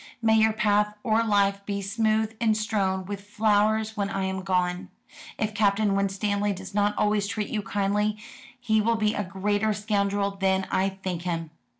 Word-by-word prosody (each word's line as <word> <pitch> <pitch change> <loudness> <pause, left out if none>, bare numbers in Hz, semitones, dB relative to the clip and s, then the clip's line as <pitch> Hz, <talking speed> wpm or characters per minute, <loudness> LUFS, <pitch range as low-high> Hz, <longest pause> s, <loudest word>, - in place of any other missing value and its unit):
"May 220 -1 +3
your 220 0 +4
path 210 -1 +1
of 225 0 +2
life 200 -1 +2
be 200 -1 -2
smooth 220 +2 0
and 220 -2 +3
strewn 195 -3 -1
with 200 +1 -5
flowers 215 +1 +1
when 200 -2 -1
I 195 -1 -2
am 190 0 -2
gone. 180 -1 -1 0.5
If 215 0 -1
Captain 205 -1 +2
Winstanley 200 +1 0
does 190 +1 -9
not 205 0 +1
always 210 -1 +1
treat 210 0 -3
you 215 - -2
kindly, 205 +1 0 0.4
he 220 -3 +2
will 230 +2 +2
be 215 -1 +1
a 205 - -2
greater 205 +3 0
scoundrel 200 -1 0
than 190 -1 0
I 190 +1 +2
think 190 -3 -5
him. 165 -3 -3
205 Hz, 175 wpm, -26 LUFS, 195-215 Hz, 0.5 s, your